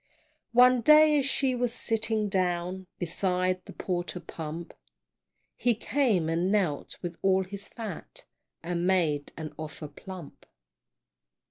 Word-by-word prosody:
One 250 0 +6
day, 305 +3 +7
as 275 - 0
she 270 -1 +1
was 245 -1 0
sitting 225 -3 0
down 185 -1 -1
Beside 185 +1 0
the - - -10
porter 180 -1 -3
pump 165 0 -7 0.8
He 240 -1 +2
came, 225 - +1
and 170 +3 +1
knelt 185 -9 0
with 175 -1 -5
all 190 0 +3
his 200 +1 -8
fat, 230 - -8 0.4
And 175 +1 -1
made 160 -6 +1
an 155 -1 -6
offer 155 0 -6
plump. 175 +2 -11
185 Hz, 125 wpm, -28 LUFS, 170-230 Hz, 0.8 s, day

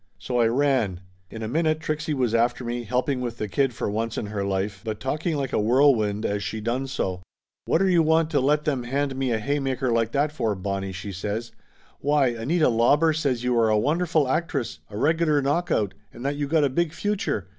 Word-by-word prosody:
So 125 -1 -2
I 115 - +4
ran. 120 -7 +1 0.3
In 110 0 -7
a - - -2
minute 155 +4 +1
Trixie 155 -1 -2
was 125 -4 0
after 120 +2 +1
me, 120 0 -3
helping 125 +3 0
with 120 -2 -4
the 105 - -3
kid 135 +5 +1
for 120 +1 -4
once 115 +2 -2
in - - -2
her 105 -1 -3
life, 100 0 -2
but 110 -2 -4
talking 155 +5 -2
like 135 -2 -3
a - - +2
whirlwind 110 -3 +3
as 100 0 -1
she 105 +2 -4
done 120 +5 -2
so. 95 -9 -3 0.4
"Whatter 190 +4 +2
you 175 -3 +4
want 160 0 +2
to 145 - +3
let 150 +3 +2
them 140 -4 0
hand 135 +2 -1
me 130 -2 -1
a 115 - +2
haymaker 135 +1 -1
like 115 -1 +1
that 145 +1 +1
for, 115 -9 -1
Bonnie?" 95 0 -3
she 95 +2 -6
says. 105 +5 -4 0.5
"Why, 145 -2 +3
Anita 135 +8 +1
Lauber 140 +7 +3
says 140 -6 -1
you 125 0 +1
are 115 -1 +3
a 110 - +3
wonderful 155 +4 +1
actress, 130 - -2
a 105 - -7
regular 155 +2 +2
knockout, 140 - 0 0.2
and 120 - -9
that 140 +1 0
you 145 0 -2
got 155 +1 +2
a 140 - +3
big 165 +3 0
future. 205 - -2
130 Hz, 215 wpm, -25 LUFS, 110-150 Hz, 0.5 s, I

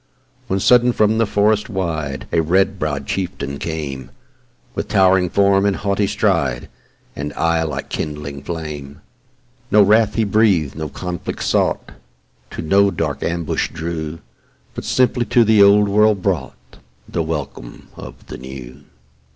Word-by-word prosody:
When 95 -4 0
sudden 125 +4 +4
from 110 0 +2
the 115 - +2
forest 105 +3 +1
wide 80 -8 -3
A 80 - +2
red 95 +4 +1
brow'd 75 -3 -2
chieftain 70 -7 -4
came, 70 -5 -5 0.6
With - - -4
towering 95 -1 +3
form, 100 0 +3
and 100 -1 +2
haughty 100 0 0
stride, 65 -8 0 0.5
And 75 +1 -4
eye 85 0 +1
like 75 -4 -4
kindling 75 -2 -5
flame: 75 -3 -7 0.7
No 105 0 +6
wrath 105 +1 +3
he 115 - +2
breath'd, 100 -8 +2
no 80 -1 -4
conflict 90 +2 -5
sought, - - 0 0.6
To - - -6
no 100 +5 +4
dark 80 -6 -3
ambush 85 -1 -1
drew, 80 -1 -5 0.6
But - - -7
simply 125 -1 +2
to 120 - +4
the 110 -2 +4
Old 100 +1 +6
World 105 -1 +3
brought, 80 -10 -3 0.3
The 85 - -2
welcome 75 -6 -6
of - - -11
the - - -9
New. 65 +1 -10
85 Hz, 145 wpm, -19 LUFS, 75-100 Hz, 0.7 s, No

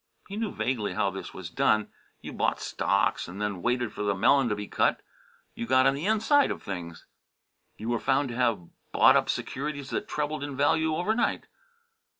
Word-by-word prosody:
He 200 - -6
knew 215 -2 -2
vaguely 115 -7 -2
how 100 - +1
this 95 - -7
was 90 -3 -8
done: 110 +3 +2 0.3
you - - -8
bought - - 0
stocks - - 0
and 90 +3 -8
then 105 -4 -2
waited 120 0 0
for - - -6
the 100 -1 +1
melon 120 +5 +4
to 105 - 0
be 105 0 -6
cut. - - +1 0.5
You 115 - -5
got 130 +1 +4
on 135 - +5
the 145 +7 -3
inside 225 +7 +3
of - - -5
things. 85 -4 -7 0.7
You 110 +2 -5
were 120 -1 0
found 135 0 +1
to 120 - -5
have 115 -8 0 0.2
bought - - +6
up - - +2
securities 140 0 -3
that - - -2
trebled 150 0 -2
in 140 -2 -5
value 155 +3 +2
over 180 +7 0
night. 235 - 0
125 Hz, 195 wpm, -27 LUFS, 105-150 Hz, 0.7 s, bought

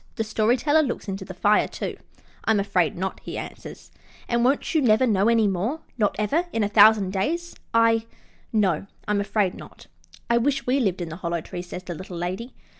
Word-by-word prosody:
The 225 - -1
Story 220 +2 +1
Teller 300 +5 +3
looks 255 -5 -3
into 195 0 -4
the 185 - -9
fire, 205 +3 +3
too. - - -5 0.5
"I'm 220 -2 +3
afraid 195 -5 +1
not," 190 +2 -3
he - - -7
answers. - - -9 0.4
"And 235 0 +1
won't 270 +7 +1
you 315 - +3
never 230 -1 +4
know 205 -3 +2
any 225 -2 +4
more? 205 - -1
Not 210 -4 +1
ever 290 - 0
in 225 - 0
a - - +2
thousand 205 -2 +6
days?" 335 - -2 0.2
"I 230 0 +3 0.4
no, 195 -5 +1 0.2
I'm 210 -1 +1
afraid 200 -2 0
not." - - -13 0.4
"I 235 0 +3
wish 275 +3 0
we 260 +3 +2
lived 190 -7 0
in 165 -2 -4
a 165 - -6
Hollow 170 -2 -2
Tree," 175 - -7
says 180 +1 -8
the 180 - -5
Little 180 +1 -8
Lady. 185 +8 -4
210 Hz, 200 wpm, -24 LUFS, 190-235 Hz, 0.5 s, thousand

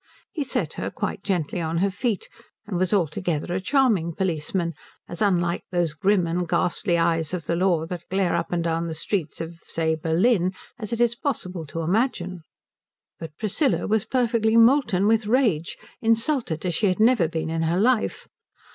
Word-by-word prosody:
He 305 - -2
set 265 - -2
her - - -2
quite - - -4
gently 175 -3 -1
on 165 0 -2
her 195 +3 +1
feet, 210 0 -2 0.4
and 200 -2 -5
was 185 -1 +1
altogether 175 -3 0
a 185 - -1
charming 205 - +2
policeman, 170 -1 -1 0.3
as 175 - -8
unlike 175 -4 +1
those 175 -3 0
grim 185 +3 +2
and 170 +1 -2
ghastly 175 +1 +1
eyes 165 0 +1
of 170 -4 -6
the 170 - 0
law 175 -3 +2
that 175 0 -7
glare 190 -1 +1
up - - -2
and 175 -1 0
down 165 0 -1
the 160 - -4
streets 165 -1 -3
of, 165 +1 -7
say, 160 -1 0
Berlin, 180 +4 +1 0.2
as 215 -1 -6
it 235 - -2
is 235 -1 +3
possible 185 - -4
to 165 +3 -4
imagine. 185 -1 -1 0.8
But 160 -2 -8
Priscilla 230 - 0
was 215 -1 +1
perfectly 230 -3 +2
molten 230 -5 +4
with 220 0 +2
rage, 215 - +1 0.2
insulted 230 - +1
as 175 - 0
she 205 +6 +1
had 185 +1 0
never 220 -6 +4
been 160 0 -3
in 165 0 -1
her 165 +2 +1
life. 235 +1 +1
180 Hz, 180 wpm, -24 LUFS, 165-220 Hz, 0.8 s, molten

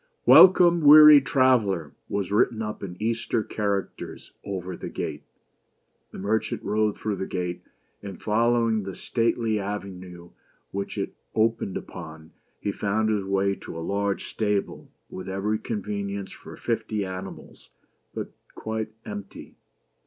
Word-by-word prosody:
"Welcome, 175 -2 +8
weary 150 0 +10
Traveler!'' 120 - +2 0.2
was 100 -2 -2
written 110 +2 +2
up 105 0 -5
in 90 -2 -7
Eastern 115 0 -1
characters 100 -2 -4
over 95 -2 -5
the - - -7
gate. - - -5 0.9
The - - -11
merchant 110 +3 -1
rode 105 +1 0
through 105 -2 -3
the 95 - -4
gate, 90 -1 -3 0.4
and 100 -3 -8
following 115 0 +2
the 95 -2 -7
stately 115 -2 0
avenue 95 -3 -7 0.4
which 100 0 -4
it - - -3 0.2
opened 110 -3 +1
upon, 80 -3 -10 0.3
he 100 - -2
found 110 +2 0
his 105 -2 0
way 100 0 +1
to - - -9
a 80 - -5
large 100 +1 -1
stable, 105 -2 -2 0.2
with 95 - -8
every 105 +3 -1
convenience 100 -2 -4
for - - -12
fifty 105 -2 -2
animals, 95 0 -9 0.5
but - - -5 0.2
quite 110 0 -4 0.2
empty. 100 -1 -8
100 Hz, 130 wpm, -25 LUFS, 95-110 Hz, 0.9 s, weary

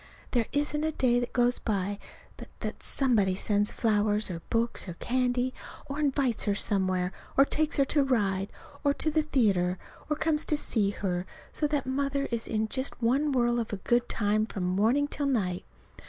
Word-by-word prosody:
There 235 -3 +1
isn't 295 +1 -1
a 315 - +1
day 245 -4 +2
goes 245 0 +3
by 200 -2 -2 0.4
but - - -10
that - - -5
somebody 215 -9 +3
sends 205 +1 +2
flowers 210 -2 +1
or 165 -1 -5
books 230 -2 -1
or 175 - -6
candy, 250 +3 0 0.3
or 280 0 -5
invites 275 -5 +1
her 205 -2 +1
somewhere, 185 -3 0 0.3
or 275 - +7
takes 305 +1 0
her 275 - +4
to 290 +2 +2
ride 200 -7 0 0.3
or 285 -1 +2
to 310 - 0
the 310 +1 +2
theater, 200 -11 +1 0.3
or 300 - +1
comes 310 0 0
to 300 - +1
see 215 -8 0
her, 185 -3 -3 0.3
so 300 - 0
that 290 -2 -1
Mother 275 +1 -1
is 230 -1 -2
in 220 0 0
just 260 +4 -3
one 270 +6 +2
whirl 240 -2 +2
of 230 - -3
good 240 0 +1
times 215 0 +1
from 190 - -4
morning 220 +11 +2
till 290 -1 -2
night. 190 -9 -1
240 Hz, 180 wpm, -28 LUFS, 205-275 Hz, 0.4 s, or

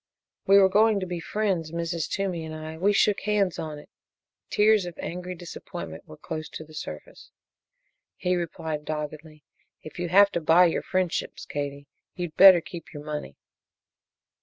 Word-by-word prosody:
"We 195 +1 +7
were 195 -1 +7
going 210 +2 +4
to - - -2
be 175 -1 -4
friends 185 -4 -1
Mrs. 170 -1 -3
Toomey 190 -4 -2
and 160 0 -7
I 155 0 -7
we 190 +5 +2
shook 205 0 +3
hands 205 -3 0
on 155 -2 -5
it!" 145 - -13 0.6
Tears 210 -3 +3
of 175 - -9
angry 180 +1 -5
disappointment 170 0 -8
were 75 - -12
close 155 -1 -6
to - - -8
the 155 0 -16
surface. 75 - -9 0.9
He 180 0 0
replied, 160 -3 -4
doggedly: 155 0 -6 0.4
"If 155 - -10
you 175 -1 -2
have 200 +3 +6
to 170 - -2
buy 165 +3 +6
your 170 - +1
friendships, 185 -2 -2
Katie, 145 0 -5 0.3
you'd 175 -3 -5
better 185 -2 +9
keep 170 -1 -10
your 145 -3 -8
money." 150 - -6
170 Hz, 165 wpm, -26 LUFS, 155-185 Hz, 0.9 s, better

